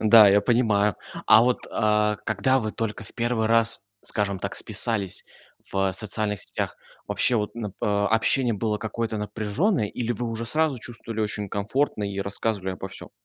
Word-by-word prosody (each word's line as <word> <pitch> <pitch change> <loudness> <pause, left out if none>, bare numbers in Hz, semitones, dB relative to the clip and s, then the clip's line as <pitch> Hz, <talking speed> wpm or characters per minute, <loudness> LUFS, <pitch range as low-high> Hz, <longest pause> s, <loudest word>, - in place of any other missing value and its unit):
Да, 110 -1 +8
я 100 +1 +5
понимаю. 105 -3 +2 0.3
А 110 - +8
вот, 125 0 0
э, 105 -1 +2
когда 110 +5 +2
вы 110 -3 -3
только 115 -2 -4
в - - -9
первый 120 -2 0
раз, 115 -3 +2 0.2
скажем 100 -2 0
так, 100 +2 -4
списались 105 -2 0 0.5
в 95 -1 0
социальных 105 0 -1
сетях, - - -3 0.3
вообще 125 - +4
вот, 105 +1 -2
н 115 -3 -3
э, 95 - -5
общение 110 +4 +2
было 105 0 -1
какое-то 110 0 -3
напряженное, 110 - 0
или 120 +3 -3
вы 120 +2 -4
уже 115 0 -3
сразу 155 -1 0
чувствовали 115 -1 -6
очень 105 -1 -2
комфортно 105 +3 -1
и 100 0 -4
рассказывали 100 -1 -2
обо 90 - -7
всём? - - -8
110 Hz, 170 wpm, -25 LUFS, 105-115 Hz, 0.5 s, Да